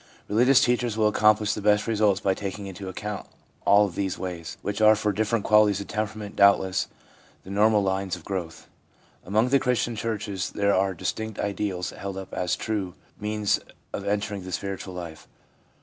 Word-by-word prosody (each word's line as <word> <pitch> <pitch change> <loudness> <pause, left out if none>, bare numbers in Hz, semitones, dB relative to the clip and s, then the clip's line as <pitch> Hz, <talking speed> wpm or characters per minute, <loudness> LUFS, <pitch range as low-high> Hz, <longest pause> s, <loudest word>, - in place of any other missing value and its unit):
Religious 125 +5 +5
teachers 120 -2 +1
will 110 -1 +4
accomplish 105 0 +3
the - - -4
best 105 +1 +3
results 105 -3 +2
by 95 -1 +1
taking 100 +1 -5
into 95 0 -7
account 105 +2 -5 0.4
all 100 +1 +6
these 95 0 -3
ways, 90 -3 -6
which 105 +1 -3
are 110 0 +7
for 105 0 0
different 110 +2 0
qualities 105 -2 +5
of 100 - -5
temperament, 110 -1 -4
doubtless, 100 -2 +4 0.6
the 95 - -10
normal 105 +1 +4
lines 95 -1 -1
of 85 - -13
growth. 90 -4 -5 0.6
Among 110 +6 +1
the 140 +1 +4
Christian 120 -2 0
churches 105 -3 -3
there 100 -1 +1
are 95 0 +1
distinct 110 +4 -4
ideals 100 -4 -2
held 100 -1 -6
up 95 -1 -8
as 90 -1 0
the - - -9
true 100 -5 -2 0.2
means 105 -1 0 0.3
of 100 - -4
enter 100 +1 -1
ing 100 -2 -5
the 95 - -7
spiritual 95 -1 -4
life. 85 -3 -8
100 Hz, 180 wpm, -26 LUFS, 95-110 Hz, 0.6 s, are